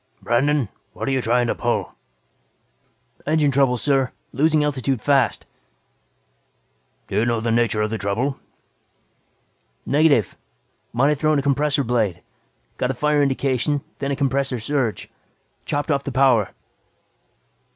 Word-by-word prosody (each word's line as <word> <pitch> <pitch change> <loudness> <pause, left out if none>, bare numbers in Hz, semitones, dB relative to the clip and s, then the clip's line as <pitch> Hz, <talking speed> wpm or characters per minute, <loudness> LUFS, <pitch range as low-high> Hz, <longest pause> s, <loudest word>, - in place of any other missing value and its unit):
"Brandon, 135 +2 +1 0.3
what're - - -5
you 135 -1 +1
trying 120 +1 +2
to 115 - 0
pull?" - - -2 1.3
"Engine 155 -2 +2
trouble, 135 -2 +2
sir. 135 0 +1 0.2
Losing 155 +3 +2
altitude 135 -3 -1
fast." 135 -3 +1 1.6
"Do - - -3
you 110 - +3
know 115 -1 +1
the 115 +1 -1
nature 115 -2 +2
of 105 - -2
the 110 - -3
trouble?" 120 +8 -1 1.5
"Negative. 140 - +3 0.6
Might 130 +5 +2
have 150 -2 0
thrown 155 -1 +2
a 140 - 0
compressor 140 +1 +1
blade. 110 -8 -1 0.6
Got 125 - 0
a 135 - -1
fire 150 +2 +2
indication, 135 +1 0 0.2
then 140 - -2
a 140 - 0
compressor 135 -1 0
surge. 120 -1 -2 0.6
Chopped 145 +1 -1
off 140 -1 0
the 140 - -4
power." 125 -6 +3
135 Hz, 130 wpm, -22 LUFS, 120-145 Hz, 1.6 s, you